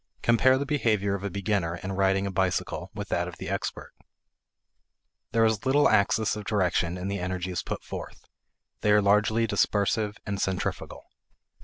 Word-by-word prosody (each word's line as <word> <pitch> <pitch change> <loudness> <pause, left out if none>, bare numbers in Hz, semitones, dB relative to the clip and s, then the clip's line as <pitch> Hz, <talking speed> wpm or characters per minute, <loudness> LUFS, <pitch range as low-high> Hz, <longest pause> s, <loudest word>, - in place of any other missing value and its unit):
Compare 130 +3 +4
the 140 - -2
behavior 110 -9 +1
of 100 -1 -4
a 100 - -2
beginner 95 -3 -1
in 95 +2 -6
riding 95 0 +1
a 100 - -2
bicycle 95 -1 -1
with - - -6
that - - 0
of - - -8
the - - -7
expert. - - -4 1.4
There 115 0 +3
is 110 -2 +1
little 140 +2 +4
axis 110 +1 +2
of 105 - -6
direction 90 -4 0
in 90 +1 -4
the 100 -1 -2
energies 90 0 -3
put - - -5
forth; - - -8 0.5
they 105 - +3
are 105 - +5
largely 105 +3 +3
dispersive 105 0 +1
and 100 -1 -3
centrifugal. 95 -1 -3
100 Hz, 165 wpm, -27 LUFS, 95-110 Hz, 1.4 s, are